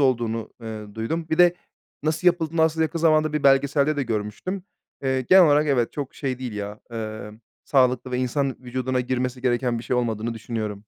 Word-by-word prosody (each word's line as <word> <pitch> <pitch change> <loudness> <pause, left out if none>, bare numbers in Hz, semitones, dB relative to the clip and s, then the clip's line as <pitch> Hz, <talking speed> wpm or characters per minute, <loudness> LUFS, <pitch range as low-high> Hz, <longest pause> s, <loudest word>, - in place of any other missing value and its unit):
olduğunu, 120 -4 0
ııı, 110 -2 -7
duydum. 155 +9 -3
Bir 160 - 0
de 175 0 +6 0.5
nasıl 160 +3 -1
yapıldığını 165 -2 +3
aslında 160 0 +2
yakın 165 +2 -3
zamanda 155 -1 +3
bir 150 - -1
belgeselde 140 +2 +3
de 140 - 0
görmüştüm. 115 - -3 0.4
Eee, 130 -1 +1
genel 185 +7 +7
olarak 150 +1 +4
evet, 125 -5 +1
çok 140 -2 -5
şey 130 -3 -3
değil 125 -4 -5
ya, 105 0 -6
emm, 110 -1 -6 0.2
sağlıklı 130 -2 +2
ve 125 - -1
insan 130 +1 -1
vücuduna 130 +1 -2
girmesi 125 0 -2
gereken 120 -1 +1
bir 115 - -8
şey 125 - 0
olmadığını 115 -1 -1
düşünüyorum. 110 -2 -5
130 Hz, 180 wpm, -24 LUFS, 115-150 Hz, 0.5 s, genel